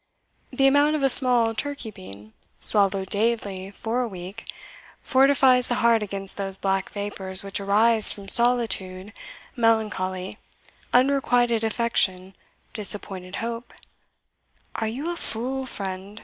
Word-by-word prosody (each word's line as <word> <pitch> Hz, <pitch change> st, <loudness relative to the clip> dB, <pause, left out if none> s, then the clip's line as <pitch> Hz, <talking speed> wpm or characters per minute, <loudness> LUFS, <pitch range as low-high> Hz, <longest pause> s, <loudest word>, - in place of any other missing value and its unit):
The 270 Hz, -, 0 dB
amount 285 Hz, +3 st, +3 dB
of 295 Hz, -, -3 dB
a 270 Hz, -, +3 dB
small 245 Hz, -3 st, +5 dB
turkey 280 Hz, -2 st, -5 dB
bean, 110 Hz, -, -13 dB, 0.3 s
swallowed 195 Hz, -2 st, +2 dB
daily 205 Hz, -3 st, -2 dB
for 225 Hz, +4 st, -4 dB
a 245 Hz, -, -2 dB
week, 190 Hz, +2 st, -10 dB, 0.5 s
fortifies 265 Hz, -2 st, +3 dB
the 240 Hz, -, -2 dB
heart 235 Hz, -2 st, +2 dB
against 195 Hz, -1 st, -8 dB
those 195 Hz, -1 st, -6 dB
black 195 Hz, 0 st, -2 dB
vapours 195 Hz, -2 st, -3 dB
which 195 Hz, 0 st, 0 dB
arise 215 Hz, +3 st, +5 dB
from 200 Hz, -1 st, -7 dB
solitude, 215 Hz, -5 st, +1 dB, 0.4 s
melancholy, 210 Hz, -6 st, -2 dB, 0.5 s
unrequited 245 Hz, -3 st, +1 dB
affection, 200 Hz, -5 st, -2 dB, 0.4 s
disappointed 195 Hz, -3 st, +2 dB
hope 235 Hz, +1 st, -8 dB, 0.5 s
" -, -, -43 dB
"Are 220 Hz, -, -3 dB
you 260 Hz, +9 st, -5 dB
a -, -, -5 dB
fool, 260 Hz, -2 st, -5 dB
friend?" 195 Hz, -1 st, -7 dB
220 Hz, 125 wpm, -23 LUFS, 195-245 Hz, 0.5 s, small